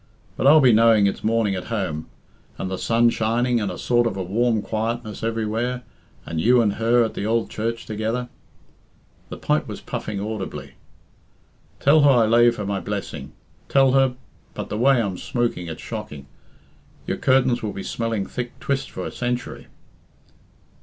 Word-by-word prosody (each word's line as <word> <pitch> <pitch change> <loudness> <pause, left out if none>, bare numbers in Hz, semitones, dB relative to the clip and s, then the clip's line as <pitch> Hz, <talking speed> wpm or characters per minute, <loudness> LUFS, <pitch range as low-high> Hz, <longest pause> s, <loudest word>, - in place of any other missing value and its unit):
But - - +1
I'll 155 +2 +8
be 125 -3 +6
knowing 110 -2 +5
it's 100 - -1
morning 110 -2 +1
at 90 -1 -4
home, 95 -9 -3 0.5
and 95 - -4
the 95 - -3
sun 115 +1 +3
shining, 115 +2 +1
and 100 - -1
a 90 - -7
sort 120 -1 +2
of 105 - -3
a 95 - -2
warm 110 +3 +1
quietness 110 0 -3
everywhere, 115 +2 -2 0.4
and 80 -1 -3
you 125 +6 +5
and 105 -4 +2
her 115 +2 +3
at 110 - -2
the 100 - -3
ould 115 0 0
church 115 +1 -3
together." 110 +3 -2 1.0
The - - -7
pipe - - 0
was - - -6
puffing 105 -2 -5
audibly. 95 -10 -5 1.1
"Tell 150 +3 +5
her 145 - +6
I 120 -4 +5
lave 120 +1 +4
her 105 - -4
my 100 0 -1
blessing. 100 0 -5 0.4
Tell 135 -1 +4
her 135 -1 +3 0.4
but - - -5
the 105 - -3
way 135 +1 +4
I'm 100 -5 -2
smooking, 120 -8 -2
it's 80 - -7
shocking. 105 -11 -7 0.8
Your - - -2
curtains 130 -2 +2
will 105 - -3
be 95 0 -6
smelling 115 -4 -2
thick 120 +3 -6
twist 140 -1 -2
for - - -6
a - - -5
century." 125 0 -4
115 Hz, 175 wpm, -23 LUFS, 105-120 Hz, 1.1 s, I'll